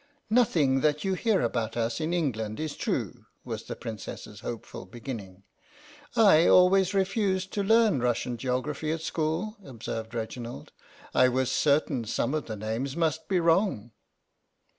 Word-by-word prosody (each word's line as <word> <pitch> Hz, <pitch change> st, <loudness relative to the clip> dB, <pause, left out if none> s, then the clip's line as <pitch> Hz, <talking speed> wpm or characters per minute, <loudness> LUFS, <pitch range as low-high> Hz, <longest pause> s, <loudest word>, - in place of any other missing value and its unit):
"Nothing 160 Hz, -, +3 dB
that 150 Hz, 0 st, +1 dB
you 195 Hz, -, 0 dB
hear 210 Hz, +2 st, +1 dB
about 115 Hz, -1 st, -1 dB
us 115 Hz, 0 st, -1 dB
in 155 Hz, +2 st, -1 dB
England 110 Hz, -11 st, -1 dB
is 155 Hz, -1 st, -3 dB
true," -, -, -3 dB, 0.2 s
was -, -, -4 dB
the -, -, -5 dB
Princess's 110 Hz, -3 st, -8 dB
hopeful 115 Hz, -5 st, -7 dB
beginning. 100 Hz, -4 st, -8 dB, 0.4 s
" 295 Hz, -1 st, -22 dB
I 195 Hz, -8 st, +6 dB
always 185 Hz, +1 st, +5 dB
refused 190 Hz, -1 st, 0 dB
to 200 Hz, -, 0 dB
learn 220 Hz, -, +4 dB
Russian 120 Hz, 0 st, 0 dB
geog 125 Hz, +1 st, -1 dB
raphy 150 Hz, +1 st, -3 dB
at 165 Hz, -, -8 dB
school," 165 Hz, +8 st, -2 dB
observed 115 Hz, -3 st, -6 dB
Reginald; 115 Hz, +1 st, -6 dB, 0.2 s
" -, -, -22 dB
I 130 Hz, -, +5 dB
was 130 Hz, 0 st, 0 dB
certain 140 Hz, -5 st, +2 dB
some 125 Hz, +5 st, -1 dB
of 155 Hz, -2 st, -2 dB
the 110 Hz, -, -4 dB
names 115 Hz, +7 st, -3 dB
must 160 Hz, -3 st, 0 dB
be 190 Hz, -2 st, +2 dB
wrong." 165 Hz, -, +1 dB
145 Hz, 160 wpm, -28 LUFS, 115-185 Hz, 0.4 s, I